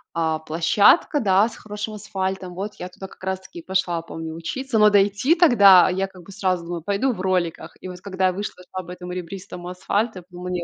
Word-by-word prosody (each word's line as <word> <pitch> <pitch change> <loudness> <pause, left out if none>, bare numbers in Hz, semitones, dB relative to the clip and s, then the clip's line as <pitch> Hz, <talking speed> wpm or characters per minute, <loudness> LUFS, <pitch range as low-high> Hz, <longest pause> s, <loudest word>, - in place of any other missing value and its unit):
а, 160 -1 0
площадка, 170 - +3
да, 200 -2 +4
с - - -12
хорошим 210 +1 -6
асфальтом. 190 -3 -4
Вот, 200 +4 -5
я 180 - -7
туда 190 +1 -9
как 190 - -18
раз 190 0 -2
таки 190 -2 -12
и - - -9
пошла, 185 -3 0
помню, 160 -1 -7
учиться. 250 +9 -3
Но 210 0 +7
дойти 205 - +3
тогда 205 - +7
я, 190 +1 -1
как 185 -2 -15
бы, 195 - -13
сразу 185 -3 -1
думаю: 170 -1 -5
"Пойду 205 +8 0
в 185 - -7
роликах". 180 -3 -1
И - - -7
вот, 180 -1 -9
когда 190 -1 0
я 185 - 0
вышла, 190 -1 -6
шла 185 0 -4
по 175 - -10
этом 180 0 -8
ребристому 180 0 -7
асфальту, 195 +3 -1
я - - -14
подумала: 180 0 -8
"Не 180 -1 -2
185 Hz, 225 wpm, -23 LUFS, 180-205 Hz, -, Но